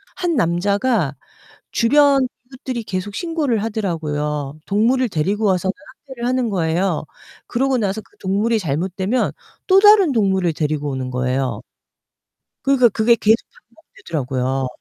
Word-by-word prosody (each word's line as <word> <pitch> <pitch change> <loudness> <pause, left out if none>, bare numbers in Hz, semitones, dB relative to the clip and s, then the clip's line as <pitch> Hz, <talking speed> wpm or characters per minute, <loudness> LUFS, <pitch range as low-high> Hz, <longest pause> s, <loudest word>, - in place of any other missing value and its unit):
한 350 -3 -1
남자가 200 - +1 0.6
주변 280 +2 +4 0.3
이웃들이 255 -2 -5
계속 200 +1 -4
신고를 310 - -1
하더라고요. 150 -8 -3
동물을 235 +5 +2
데리고 200 +5 0
와서는 190 0 +1 0.3
학대를 250 -3 -6
하는 255 -1 0
거예요. 170 -2 0 0.4
그러고 265 +2 0
나서 205 -1 -1
그 - - -28
동물이 210 +4 0
잘못되면 190 - -1 0.3
또 380 0 +6
다른 410 -6 +6
동물을 190 -7 +1
데리고 150 -1 -2
오는 130 -1 -4
거예요. 125 -2 -1 1.0
그러니까 270 -3 +5
그게 225 +2 +3
계속 220 0 +4 0.4
반복되더라고요. 135 - -3
200 Hz, 320 characters per minute, -20 LUFS, 155-250 Hz, 1.0 s, 또